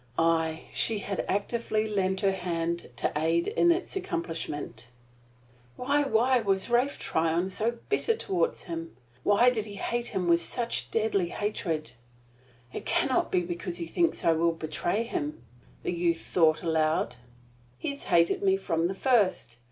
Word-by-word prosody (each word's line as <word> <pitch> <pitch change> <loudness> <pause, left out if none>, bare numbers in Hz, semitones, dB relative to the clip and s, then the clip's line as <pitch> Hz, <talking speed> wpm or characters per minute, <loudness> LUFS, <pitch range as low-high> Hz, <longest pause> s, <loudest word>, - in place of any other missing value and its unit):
Aye, 165 -1 +1
she 225 - +1
had 200 -1 -3
actively 215 +1 0
lent 190 -2 0
her 195 -2 +3
hand 170 -2 -2
to - - -1
aid 165 +2 +2
in 345 - +4
its 355 +3 -1
accomplishment. 165 - -4 0.9
Why 280 +3 +1
why 255 -1 +3
was 195 0 0
Ralph 250 +4 +2
Tryon 165 +3 0
so 225 +5 -1
bitter 440 +2 +1
toward 180 - 0
him? 165 -5 -6 0.2
Why 205 - +5
did 220 -3 -2
he 205 - -8
hate 240 +4 -2
him 190 -4 -2
with 170 0 +4
such 235 +6 -2
deadly 215 -5 +1
hatred? 165 - -2 0.8
"It - - -5
can - - +1
not 260 - +1
be 180 - +3
because 175 0 -4
he 170 - -3
thinks 335 - 0
I 165 - +6
will 165 +1 +2
betray 165 +6 -1
him," 150 - -4 0.4
the - - -1
youth 170 -1 0
thought 160 -2 +2
aloud. 155 -7 +1 0.6
"He - - -3
has 280 - -8
hated 170 0 +3
me 195 -1 +3
from 165 -3 0
the 190 - -4
first. 200 - +1
185 Hz, 160 wpm, -28 LUFS, 165-230 Hz, 0.9 s, I